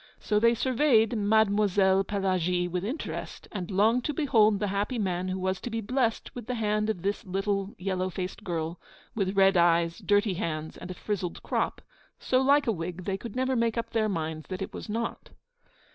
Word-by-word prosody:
So 210 -1 +1
they 230 +2 +4
surveyed 245 -3 +3
Mademoiselle 205 -2 +3
Pelagie 185 -3 0
with 180 +1 -3
interest, 255 +10 -5
and 185 -4 -5
longed 220 +5 +3
to 300 - -2
behold 220 -8 +4
the 205 0 -1
happy 205 +5 -1
man 185 -3 -1
who 185 0 -2
was 190 0 -2
to - - -4
be 225 0 -2
blessed 230 +1 -1
with 240 -3 -8
the 250 - -2
hand 215 -1 0
of 180 -6 -3
this 200 +1 -1
little, 195 +1 -2
yellow 185 0 -1
faced 185 +2 -5
girl, 165 -2 -3 0.3
with 195 -2 -1
red 195 -1 +5
eyes, 170 -1 +3
dirty 205 -1 +2
hands, 160 -4 -3
and 180 - -9
a 185 - -5
frizzled 185 -3 -4
crop, - - -1 0.4
so 255 0 +1
like 280 +2 +4
a 230 - +2
wig 180 -1 -5
they 195 -1 -2 0.2
never 260 +1 0
could 245 - +1
make 230 0 +1
up 230 - -3
their 220 -2 +1
minds 160 -4 -3
that 185 0 -4
it - - -8
was - - -7
not. 230 +2 -3
200 Hz, 195 wpm, -28 LUFS, 185-225 Hz, 0.4 s, red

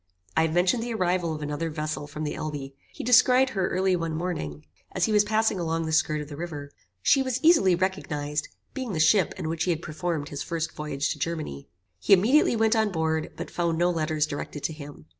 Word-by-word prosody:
I - - +4
have 160 - -4
mentioned 185 +7 +3
the 235 0 -3
arrival 180 -4 0
of 150 - -6
another 150 +3 -2
vessel 155 -1 -4
from 150 +1 -6
the 150 - -2
Elbe. 150 -3 -5 0.2
He - - -7
descried 250 +2 +5
her 190 -5 0
early 190 0 +1
one 165 -2 -2
morning 115 - -4 0.3
as 185 -2 +2
he - - -1
was 210 -1 +5
passing 215 -1 +1
along 165 -1 -1
the 160 - -3
skirt 155 -1 +2
of 150 - -7
the 145 - -8
river. 145 -3 -6 0.3
She 270 - +5
was 260 -2 -1
easily 255 - +5
recognized, 150 -5 -2 0.3
being 260 -6 -4
the 160 - -2
ship 170 +3 +4
in - - -4
which 165 0 -1
he - - -1
had 170 0 -1
performed 155 -1 -3
his 145 - -5
first 165 -1 -3
voyage 150 -1 -3
to - - -13
Germany. 155 - -4 0.3
He 90 - +4
immediately 235 +8 +4
went 220 0 +3
on 220 -2 +2
board, 160 -1 -1
but - - -6
found 170 -2 0
no 175 +1 +3
letters 155 -2 0
directed 145 -1 -6
to 160 - -1
him. 145 - -11
165 Hz, 220 wpm, -26 LUFS, 150-190 Hz, 0.3 s, descried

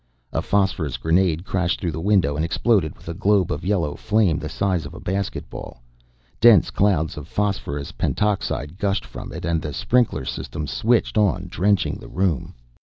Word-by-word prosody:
A - - 0
phosphorus 95 -10 0
grenade 85 +1 +1
crashed 90 -3 0
through 85 - -2
the 80 - -5
window 90 -7 +2
and 75 - 0
exploded 95 -1 +1
with - - -18
a 85 - -3
globe 100 0 +2
of - - -3
yellow 90 -6 0
flame 105 -5 +1
the - - -5
size 95 -4 0
of - - -11
a - - -8
basketball; 95 -9 -5 0.6
dense 110 -6 +6
clouds 90 -7 +1
of 75 0 -7
phosphorus 85 -8 -2
pentoxide 95 -5 -1
gushed 100 -1 0
from - - -8
it - - -6
and 85 -2 0
the 75 -1 -5
sprinkler 100 - +1
system 75 +3 -4
switched 110 - +1
on, 95 -3 +1
drenching 100 0 +1
the - - -11
room. 90 -7 -1
90 Hz, 175 wpm, -22 LUFS, 80-100 Hz, 0.6 s, dense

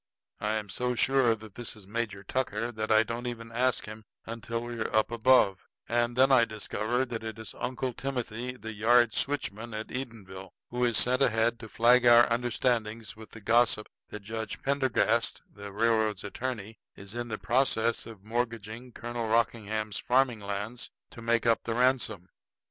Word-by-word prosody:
I 105 0 -1
am 110 -1 -2
so 125 +4 -1
sure 130 -2 +3
that 110 -2 -12
this 120 +2 -6
is 105 -3 -14
Major 105 -1 -3
Tucker 115 0 -2
that 110 -1 -3
I 110 0 +6
don't 115 +2 -4
even 115 -1 -6
ask 125 -2 +1
him 110 +1 -9 0.2
until 115 +1 -4
we 120 -1 -6
are 115 - -2
up 110 +1 +3
above; 115 -5 +3 0.2
and 120 0 +1
then 130 +2 +5
I 130 -3 +7
discover 110 +3 -1
that 115 -3 -5
it 110 -1 -5
is 110 -1 -8
Uncle 130 0 -3
Timothy, 125 -2 -4
the 110 -2 -7
yard 120 +2 +4
switchman 115 -5 0
at 110 +1 -5
Edenville, 100 -7 -7 0.2
who 125 +1 -1
is 120 -3 +2
sent 125 +2 +3
ahead 115 -1 +2
to 110 -1 -9
flag 120 +2 +5
our 120 0 +8
understandings 115 -2 -1
with 110 0 -12
the 115 - -12
gossip 110 0 +3 0.2
that 105 - -8
Judge 110 +1 -5
Pendergast, 130 -4 +1
the 100 -1 -10
railroad's 110 -1 +1
attorney, 110 0 -5 0.2
is 100 +1 -9
in 120 0 -4
the 110 -2 -3
process 115 +1 +1
of 110 -4 -11
mortgaging 115 +1 -4
Colonel 120 -1 -4
Rockingham's 110 -2 0
farming 125 -2 +2
lands 100 +4 -5 0.2
to 115 - -11
make 115 0 +1
up 115 -1 +3
the 115 - -2
ransom. 120 -7 +1
115 Hz, 175 wpm, -29 LUFS, 110-120 Hz, 0.2 s, our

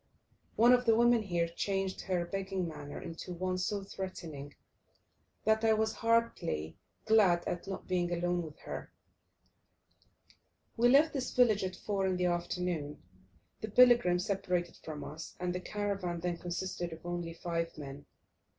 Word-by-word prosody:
One 240 +3 +7
of 250 0 +3
the 225 -1 +5
women 235 0 +5
here 175 -5 0
changed 195 +2 -2
her 180 -2 -1
begging 190 -1 -2
manner 150 -3 -7
into 170 +2 -7
one 185 +1 -1
so 200 +2 -1
threatening, 165 -7 -7 0.9
that 220 +1 +3
I 220 -1 +5
was 220 0 +1
heartily 230 - 0 0.3
glad 205 -6 +4
at 175 +2 -3
not 195 - -6
being 175 -1 0
alone 175 0 0
with 155 -2 -8
her. - - -7 1.8
We 240 +1 +4
left 295 +5 +5
this 265 -3 -2
village 225 -5 +4
at 185 -1 -3
4 195 0 -1
in 185 -1 0
the 180 - +1
afternoon. 175 -3 -2 0.6
The 220 - -4
pilgrim 240 -6 +6
separated 180 -2 -1
from 155 -2 -7
us, 160 +2 -8
and 180 0 -1
the 180 - -2
caravan 195 -3 -2
then 175 -1 -1
consisted 175 0 -3
of 160 +1 -12
only 175 -1 -4
five 165 -2 -3
men. 140 -1 -8
180 Hz, 150 wpm, -32 LUFS, 170-210 Hz, 1.8 s, One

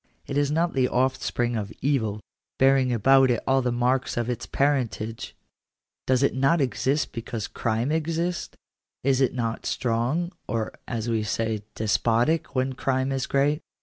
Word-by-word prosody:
Is 145 0 0
it - - -1
not 170 +1 +1
the 130 -2 +2
offspring 125 -2 0
of 105 -1 -3
evil, 110 -7 0 0.4
bearing; 135 -1 +4
about 130 +3 +5
it 120 - +2
all 135 0 +3
the 125 -1 0
marks 125 +2 0
of 120 +1 0
its 120 - -5
parentage? 125 -5 -1 0.7
Does 130 +1 +3
it 140 - +3
not 135 +6 +3
exist 135 0 0
because 115 -2 -5
crime 115 +4 -1
exists? 165 +2 -2 0.5
Is 135 0 +2
it 130 - +2
not 115 -2 -2
strong, 130 +9 0 0.2
or, 110 0 -2
as 115 -2 -3
we 115 -2 +1
say, 110 0 -1
despotic, 120 +8 +1
when 130 +1 0
crime 130 +1 0
is 135 0 -1
great 145 +3 +1
130 Hz, 155 wpm, -25 LUFS, 115-140 Hz, 0.7 s, about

